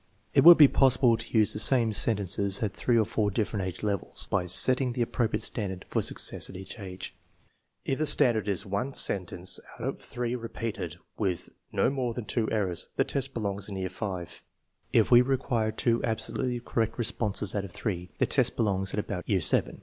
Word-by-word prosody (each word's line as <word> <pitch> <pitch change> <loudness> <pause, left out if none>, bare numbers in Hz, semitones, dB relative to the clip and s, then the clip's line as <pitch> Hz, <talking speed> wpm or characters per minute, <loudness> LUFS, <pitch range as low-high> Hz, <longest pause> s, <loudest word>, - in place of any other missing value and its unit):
It - - +4
would 170 +1 +10
be 150 - +9
possible 130 -3 +3
to 115 0 -4
use 110 -1 +4
the - - -3
same 115 -2 +4
sen 105 +1 +2
tences 100 +1 0
at 105 - -2
three 120 -2 0
or 110 - +3
four 110 -1 -1
different 100 -2 -2
age 95 - -7
levels, 100 -3 -2
by 90 -3 0
setting 125 +7 +3
the 120 -1 0
appropriate 115 0 -2
standard 95 -5 -3
for - - 0
success - - +2
at - - -11
each 95 +4 -9
age. 95 -2 -8 0.7
If 135 - -2
the 155 - +1
stand 135 -5 +5
ard 105 -2 -3
is 100 -3 0
one 105 +8 -3
sentence 90 -1 +2 0.2
out - - -5
of - - -5
three 120 0 -4
repeated 115 -7 -6 0.2
with 95 -5 -2 0.2
no - - +1
more 125 -4 -3
than 120 - -5
two 115 -1 -2
errors, 95 -6 -2
the - - +2
test 135 -1 -4
belongs 100 -3 -3
in 100 - -6
year 95 -1 -3
V. 95 -2 -5 0.7
If - - +2
we 120 0 +8
require 125 -4 -1
two 115 +1 0
absolutely 120 +2 -2
correct 115 -2 -2
responses 105 -4 0
out 100 - -2
of 100 - -9
three, 90 -2 -4
the - - +2
test - - 0
belongs 95 -3 -1
at - - -1
about 90 -3 -5
year 100 -3 +2
VII. 80 - +1
110 Hz, 205 wpm, -27 LUFS, 95-120 Hz, 0.7 s, would